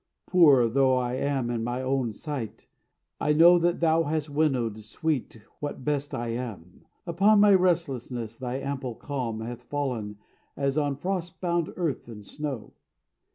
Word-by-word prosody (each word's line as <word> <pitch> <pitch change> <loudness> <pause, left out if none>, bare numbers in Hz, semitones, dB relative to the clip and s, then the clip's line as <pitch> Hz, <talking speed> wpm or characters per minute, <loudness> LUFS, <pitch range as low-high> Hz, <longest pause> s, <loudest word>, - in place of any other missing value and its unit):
Poor 145 -9 +6
though 130 +2 +3
I 125 -1 -1
am 130 -2 -1
in 115 -2 -2
my 120 +2 -2
own 130 -3 0
sight, 120 -2 -6 0.5
I 150 - +2
know 170 +3 +7
That 170 0 +1
thou 165 0 +4
hast 150 0 -2
winnowed, 130 -8 0
sweet, 120 +2 -3 0.2
what 145 -3 -5
best 145 -1 -1
I 120 0 -3
am; 115 -8 -6 0.2
Upon 195 +5 +4
my 205 0 +7
restlessness 135 - 0
thy 125 0 -4
ample 135 -2 -4
calm 120 -6 -4
Hath 120 +1 -6
fallen 125 -6 -3 0.4
as 140 -1 0
on 145 -2 0
frost 180 +3 -3
bound 170 -2 0
earth 165 -10 -2
the 110 -3 -10
snow. 140 -1 -6
135 Hz, 155 wpm, -27 LUFS, 120-160 Hz, 0.5 s, know